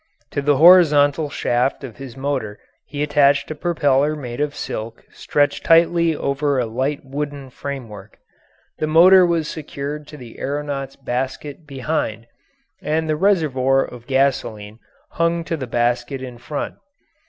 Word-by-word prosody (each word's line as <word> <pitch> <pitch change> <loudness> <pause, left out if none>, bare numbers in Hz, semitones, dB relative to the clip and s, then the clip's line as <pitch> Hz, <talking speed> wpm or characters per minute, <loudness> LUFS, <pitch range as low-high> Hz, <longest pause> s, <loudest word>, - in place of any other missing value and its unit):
To 145 - -2
the 145 0 +2
horizontal 155 -3 +6
shaft 125 0 -1
of 125 -5 -9
his 135 -2 -10
motor 135 -7 -3 0.3
he 145 +2 -3
attached 145 0 +2
a - - -1
propeller 150 -3 +1
made 125 -3 -6
of 150 -1 -1
silk 115 +1 -6
stretched 145 -1 0
tightly 165 0 +4
over 140 0 -1
a 125 - +1
light 130 +6 -2
wooden 140 -1 -5
framework. 115 -8 -8 0.6
The 155 - 0
motor 180 +4 +7
was 165 -3 0
secured 150 -1 -6
to 150 - -11
the 120 -4 -12
aeronaut's 140 -1 -4
basket 135 +5 -5
behind, 135 -5 -3 0.6
and 160 +1 -1
the 155 - +1
reservoir 145 -8 +2
of 120 -1 -12
gasoline 115 -6 -1 0.3
hung 170 0 0
to 165 - -3
the 135 -5 -6
basket 120 +3 -1
in 125 -2 -8
front. 145 +4 -5
140 Hz, 140 wpm, -20 LUFS, 130-155 Hz, 0.6 s, motor